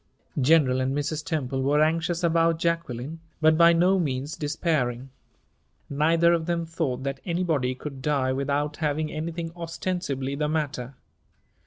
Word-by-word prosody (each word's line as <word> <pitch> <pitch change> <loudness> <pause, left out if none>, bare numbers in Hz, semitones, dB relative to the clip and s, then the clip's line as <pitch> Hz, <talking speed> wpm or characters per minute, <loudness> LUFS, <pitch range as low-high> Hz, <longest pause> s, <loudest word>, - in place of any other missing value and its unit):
General 130 -2 +4
and 135 +2 0
Mrs. 150 +1 -2
Temple 135 -6 -2
were 145 +3 +3
anxious 165 +2 0
about 165 0 +3
Jacqueline, 165 -3 -2 0.2
but 155 0 +5
by 170 +1 +7
no 180 +3 +3
means 140 -2 -2
despairing. 140 -5 -1 0.8
Neither 165 +4 +3
of 165 -1 -1
them 170 -1 0
thought 155 -6 -2
that 135 0 -3
anybody 165 -8 0
could 135 0 -8
die 130 -2 +1
without 145 +2 -1
having 155 0 -1
anything 165 +1 -4
ostensibly 165 -5 -3
the 150 +1 -1
matter. 140 -5 -3
155 Hz, 140 wpm, -26 LUFS, 135-165 Hz, 0.8 s, by